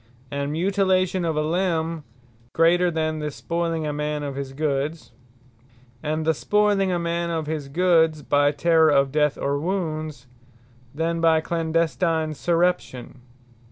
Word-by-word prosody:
And 140 Hz, 0 st, -2 dB
Mutilation 185 Hz, +1 st, +1 dB
of 165 Hz, -2 st, -1 dB
a 150 Hz, -, +1 dB
limbe, 165 Hz, -1 st, -1 dB, 0.5 s
greater, 175 Hz, +2 st, +4 dB
than 155 Hz, -1 st, -2 dB
the 150 Hz, 0 st, -3 dB
spoyling 165 Hz, +1 st, -3 dB
a 150 Hz, -, -2 dB
man 150 Hz, 0 st, -3 dB
of 140 Hz, -2 st, -4 dB
his 140 Hz, -1 st, -5 dB
goods. 145 Hz, +2 st, -2 dB, 0.9 s
And 155 Hz, +1 st, -2 dB
the 160 Hz, -, +3 dB
spoyling 205 Hz, +3 st, +1 dB
a 180 Hz, -, 0 dB
man 170 Hz, 0 st, -2 dB
of 165 Hz, -2 st, -2 dB
his 150 Hz, -2 st, -4 dB
goods, 160 Hz, -1 st, +2 dB
by 145 Hz, +1 st, +3 dB
Terrour 160 Hz, +2 st, +3 dB
of 140 Hz, -2 st, +3 dB
death, 150 Hz, -1 st, +1 dB
or 140 Hz, +1 st, -1 dB
wounds, 155 Hz, -6 st, -3 dB, 0.7 s
than 165 Hz, +3 st, -2 dB
by 165 Hz, -1 st, +4 dB
clandestine 160 Hz, -1 st, 0 dB
surreption. 170 Hz, -6 st, -1 dB
160 Hz, 140 wpm, -23 LUFS, 150-170 Hz, 0.9 s, greater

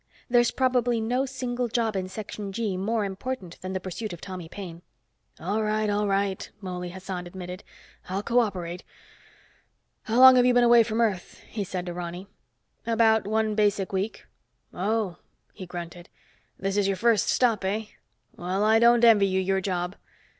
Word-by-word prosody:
There's 240 Hz, -1 st, +5 dB
probably 245 Hz, -2 st, +1 dB
no 250 Hz, +5 st, 0 dB
single 250 Hz, -2 st, -3 dB
job 225 Hz, -2 st, 0 dB
in 185 Hz, -1 st, -2 dB
Section 205 Hz, 0 st, -6 dB
G 210 Hz, -2 st, -2 dB
more 210 Hz, +3 st, -1 dB
important 195 Hz, -2 st, -6 dB
than 185 Hz, 0 st, -5 dB
the 185 Hz, -, -1 dB
pursuit 185 Hz, +3 st, -5 dB
of 175 Hz, -, -8 dB
Tommy 180 Hz, -3 st, -8 dB
Paine." 175 Hz, -3 st, -8 dB, 0.6 s
"All 200 Hz, +7 st, -1 dB
right, 215 Hz, 0 st, 0 dB
all 205 Hz, 0 st, 0 dB
right," 195 Hz, -1 st, -1 dB
Mouley 180 Hz, -2 st, -5 dB
Hassan 185 Hz, -1 st, -6 dB
admitted. 180 Hz, +1 st, -8 dB, 0.5 s
"I'll 195 Hz, +2 st, -2 dB
co 240 Hz, +2 st, +3 dB
operate. 180 Hz, -6 st, -2 dB, 1.2 s
How 225 Hz, -, -1 dB
long 260 Hz, 0 st, +10 dB
have 245 Hz, -, +5 dB
you 250 Hz, -, +3 dB
been 245 Hz, -, +5 dB
away 235 Hz, 0 st, +7 dB
from 225 Hz, 0 st, 0 dB
Earth?" 200 Hz, -6 st, -1 dB
he 210 Hz, -, -4 dB
said 180 Hz, -2 st, -4 dB
to 175 Hz, -, -4 dB
Ronny. 175 Hz, +1 st, -6 dB, 0.6 s
"About 225 Hz, -2 st, +3 dB
one 220 Hz, 0 st, +1 dB
basic 205 Hz, -3 st, +1 dB
week." 195 Hz, +3 st, -3 dB, 0.5 s
"Oh," 200 Hz, -1 st, -1 dB, 0.4 s
he 185 Hz, -, -9 dB
grunted. 175 Hz, 0 st, -8 dB, 0.5 s
"This 195 Hz, +1 st, -2 dB
is 200 Hz, -1 st, +2 dB
your 195 Hz, -1 st, 0 dB
first 230 Hz, -1 st, +2 dB
stop, 230 Hz, -6 st, +2 dB
eh? 205 Hz, +3 st, -1 dB, 0.5 s
Well, 185 Hz, +3 st, -2 dB
I 220 Hz, +1 st, +5 dB
don't 235 Hz, 0 st, +5 dB
envy 210 Hz, -4 st, +6 dB
you 190 Hz, 0 st, +1 dB
your 190 Hz, +1 st, 0 dB
job." 180 Hz, 0 st, -2 dB
200 Hz, 170 wpm, -26 LUFS, 185-225 Hz, 1.2 s, long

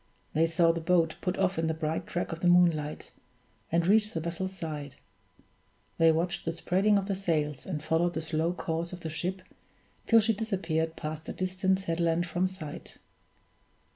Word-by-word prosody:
They 160 Hz, +2 st, +3 dB
saw 165 Hz, 0 st, +4 dB
the 165 Hz, 0 st, -3 dB
boat 165 Hz, -1 st, +3 dB
put 180 Hz, 0 st, -1 dB
off 190 Hz, -2 st, +1 dB
in 165 Hz, -, +1 dB
the 160 Hz, -, 0 dB
bright 160 Hz, 0 st, -2 dB
track 175 Hz, -, -2 dB
of 165 Hz, -, -5 dB
the 175 Hz, -, +1 dB
moonlight, 170 Hz, -4 st, +3 dB, 0.6 s
and 170 Hz, +1 st, +2 dB
reach 210 Hz, +3 st, +4 dB
the 165 Hz, -, -1 dB
vessel's 170 Hz, +3 st, -3 dB
side; 150 Hz, -5 st, -5 dB, 1.0 s
they 165 Hz, 0 st, +6 dB
watched 175 Hz, +2 st, -1 dB
the 165 Hz, -, -1 dB
spreading 190 Hz, +5 st, +2 dB
of 195 Hz, -1 st, -1 dB
the 200 Hz, -, 0 dB
sails, 155 Hz, -7 st, -1 dB
and 155 Hz, -5 st, -3 dB
followed 170 Hz, +2 st, +1 dB
the 160 Hz, -, -1 dB
slow 160 Hz, +1 st, 0 dB
course 170 Hz, -1 st, -3 dB
of 180 Hz, -, -8 dB
the 160 Hz, -, -4 dB
ship 185 Hz, +4 st, -3 dB, 0.6 s
till 230 Hz, -, +7 dB
she 225 Hz, +1 st, +2 dB
disappeared 170 Hz, -7 st, -1 dB
past 155 Hz, +1 st, -6 dB
a -, -, -3 dB
distant 185 Hz, +1 st, 0 dB
headland 170 Hz, -1 st, 0 dB
from 175 Hz, +2 st, 0 dB
sight. 185 Hz, -5 st, -7 dB
170 Hz, 180 wpm, -29 LUFS, 160-185 Hz, 1.0 s, till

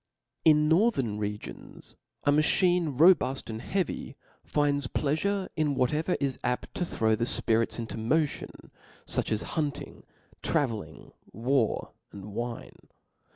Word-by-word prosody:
In 150 Hz, -1 st, +5 dB
northern 160 Hz, -, +2 dB
regions 105 Hz, 0 st, -7 dB, 0.3 s
a 145 Hz, -, +4 dB
machine 155 Hz, 0 st, +2 dB
robuft 150 Hz, -7 st, +4 dB
and 110 Hz, +1 st, -5 dB
heavy, 185 Hz, +2 st, -2 dB, 0.3 s
finds 145 Hz, -2 st, +1 dB
a -, -, -15 dB
plea 145 Hz, -1 st, 0 dB
fure 200 Hz, +3 st, -1 dB
in 150 Hz, -3 st, +1 dB
whatever 150 Hz, +7 st, +1 dB
is 135 Hz, -2 st, -1 dB
apt 125 Hz, 0 st, -2 dB
to -, -, -2 dB
throw 110 Hz, -8 st, +1 dB
the 115 Hz, +2 st, -1 dB
fpirits 115 Hz, -1 st, 0 dB
into 115 Hz, -2 st, -5 dB
motion, 145 Hz, +7 st, -1 dB, 0.3 s
fuch -, -, -1 dB
as 110 Hz, -, 0 dB
hunting, 150 Hz, -4 st, -3 dB, 0.4 s
travelling, 110 Hz, -, -2 dB, 0.2 s
war, 120 Hz, +1 st, 0 dB, 0.2 s
and 100 Hz, -, -9 dB
^ine. 115 Hz, +4 st, -6 dB
140 Hz, 130 wpm, -28 LUFS, 115-155 Hz, 0.4 s, In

